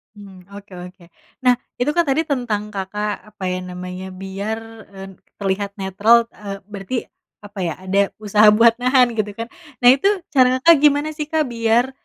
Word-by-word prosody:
Mmm, 190 -3 -14
oke-oke 180 -3 -12 0.3
nah 250 -1 +3 0.2
itu 245 +4 0
kan 340 +2 +1
tadi 280 +4 +1
tentang 240 -8 -3
Kakak 205 +1 -4 0.2
apa - - -9
ya 180 - -2
namanya 180 0 -7 0.2
biar, 200 +3 -4 0.4
eee, 195 0 -8 0.3
terlihat 200 0 -3
netral, 200 +3 +3 0.2
eee, 200 -1 -8 0.2
berarti 200 +4 -5 0.5
apa 205 -1 -10
ya 165 - -2
ada 190 +1 0 0.2
usaha 210 0 +3
buat 230 0 +6
nahan 250 0 +3
gitu 215 -2 -2
kan 230 +1 -5 0.4
nah 245 - +8
itu 270 +9 +2 0.2
cara 260 -3 +5 0.2
Kakak 335 0 +8
gimana 295 +1 +3
sih 300 -1 -5
Kak 315 0 +1
biar, 230 +2 +1
210 Hz, 165 wpm, -20 LUFS, 195-250 Hz, 0.5 s, nah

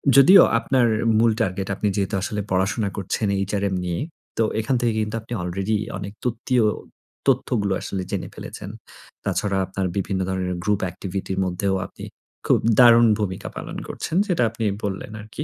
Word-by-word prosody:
যদিও 175 +8 +9 0.2
আপনার 125 +1 +2 0.3
মূল 115 +1 +4
টার্গেট 95 -2 -1
আপনি 105 - -1
যেহেতু 100 0 -1
আসলে 105 +2 -2
পড়াশোনা 100 +3 +1
করছেন 100 +2 -1 0.2
HRM 100 -2 0
নিয়ে। 85 -1 -2 0.4
তো 115 - +3 0.2
এখান 115 +4 0
থেকে 120 -2 +2
কিন্তু 105 +1 -3
আপনি 115 +2 -8
already 95 +5 -1 0.2
অনেক 100 +1 -6
তথ্যিও 120 0 +1 0.6
তথ্যগুলো 120 -6 +2
আসলে 95 - -3
জেনে - - -2
ফেলেছেন। - - -8 0.6
তাছাড়া 100 -2 0
আপনার 95 +1 -3
বিভিন্ন 95 0 -1
ধরনের 95 -1 -1
group 105 0 +1
activity 95 +1 -5
এর - - -2
মধ্যেও 95 +2 0
আপনি - - -11 0.4
খুব - - +4 0.2
দারুণ 120 -1 +8
ভূমিকা 95 -3 -3
পালন - - -6
করছেন। - - -4
যেটা 175 - +2
আপনি 115 0 -4 0.2
বললেন 100 +1 -4
আরকি। 110 +8 -6
105 Hz, 160 wpm, -23 LUFS, 95-115 Hz, 0.6 s, যদিও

